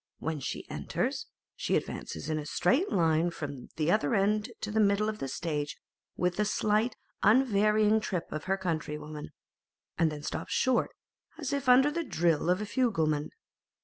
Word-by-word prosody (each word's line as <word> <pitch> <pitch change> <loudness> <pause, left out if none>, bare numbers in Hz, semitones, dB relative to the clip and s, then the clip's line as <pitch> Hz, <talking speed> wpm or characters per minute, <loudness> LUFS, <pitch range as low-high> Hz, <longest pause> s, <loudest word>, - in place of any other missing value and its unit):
When 160 -2 -3
she 135 - -5
enters, - - -2 0.3
she - - 0
advances 80 - -3
in 155 -1 -1
a 150 - -6
straight 265 - +2
line 165 0 +3
from 145 -6 -6
the 155 +2 +1
other 145 - +2
end 210 +1 +2
to 210 - -3
the 220 - +1
middle 205 0 +3
of 215 0 -3
the 135 - -3
stage 150 +1 -3 0.4
with 180 0 0
the 210 - +3
slight 215 +3 +1 0.3
unvarying 215 -2 +4
trip 185 -5 -2
of 155 +2 -4
her 190 +1 +1
countrywomen, 155 -4 -4 0.7
and 165 -2 +3
then 150 -1 -7
stops - - -4
short, 260 -2 +2 0.5
as 290 -4 -3
if 280 -2 0
under 265 +4 +6
the 335 +2 -2
drill 170 - +1
of 180 +3 +2
a - - -2
fugleman. 165 - +1
185 Hz, 170 wpm, -30 LUFS, 155-215 Hz, 0.7 s, under